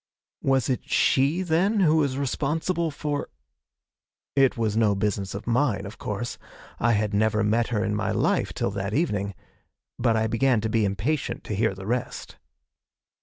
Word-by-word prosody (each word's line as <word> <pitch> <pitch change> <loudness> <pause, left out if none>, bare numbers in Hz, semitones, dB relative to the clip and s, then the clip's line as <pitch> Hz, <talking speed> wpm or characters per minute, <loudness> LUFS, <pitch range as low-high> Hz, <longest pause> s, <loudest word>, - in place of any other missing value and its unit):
Was 135 -2 +2
it 130 - -2
she, 145 +7 +3
then, 190 +5 +2
who 160 -3 +4
was 140 -4 +1
responsible 160 +5 -1
for? 145 -1 -3 1.1
It 135 -3 +4
was 110 -2 0
no 110 -3 +3
business 100 -1 -2
of 100 - -6
mine, 115 -4 +1
of 100 +3 -9
course; 110 +4 -4 0.4
I 115 +1 +3
had 105 -1 0
never 110 +1 +2
met 115 +2 +2
her 110 -2 -1
in 105 - -1
my 105 - -1
life - - +1
till - - -2
that 100 0 -3
evening 105 - 0 0.6
but 115 -2 +2
I 110 - +1
began 115 +2 +2
to 110 - -1
be 110 -1 +2
impatient 115 +10 -2
to 105 - -4
hear 110 -1 +1
the 95 0 -9
rest. 120 +3 -3
115 Hz, 170 wpm, -25 LUFS, 105-140 Hz, 1.1 s, who